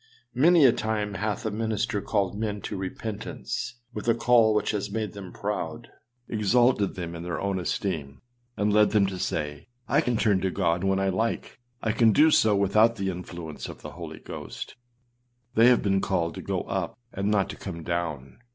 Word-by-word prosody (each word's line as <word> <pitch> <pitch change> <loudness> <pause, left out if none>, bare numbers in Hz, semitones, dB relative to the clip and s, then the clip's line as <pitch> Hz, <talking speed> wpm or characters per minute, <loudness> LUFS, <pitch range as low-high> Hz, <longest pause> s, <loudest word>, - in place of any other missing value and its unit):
â - - -5
Many 165 -1 +7
a 125 - +8
time 110 -3 -2
hath 105 +4 -2
a 110 - 0
minister 110 -1 -1
called 100 -3 0
men 105 -1 -2
to - - -5
repentance 95 - -5 0.2
with 105 +1 -6
a 115 - +4
call 115 -3 +4
which 105 - +1
has 105 -1 -2
made 110 +1 -3
them 100 -3 -8
proud, - - -4 0.4
exalted 110 0 +2
them 85 -2 -5
in 85 - -6
their 85 0 -3
own 100 -1 -1
esteem, 80 -6 -3 0.4
and 105 0 +1
led 105 0 +5
them 105 -2 +5
to 95 -1 -4
say, 75 -3 -3 0.2
âI 150 +3 +3
can 120 -4 0
turn 100 -4 +2
to 95 - +1
God 90 -2 0
when 95 0 +2
I 95 0 +1
like; 110 +7 -2 0.2
I 110 - +2
can 110 -1 +4
do 155 +6 +6
so 110 -7 +4
without 110 +4 +4
the 95 -3 -1
influence 85 -3 -7
of - - -10
the - - -7
Holy - - -8
Ghost.â - - -8 0.8
They 115 +2 +6
have 125 -1 +5
been 95 -1 +2
called 85 -4 0
to - - -7
go - - -2
up - - -3 0.2
and 100 +1 -1
not 100 -2 +2
to - - -8
come 85 -4 -7
down. 80 -6 -3
100 Hz, 195 wpm, -26 LUFS, 90-110 Hz, 0.8 s, a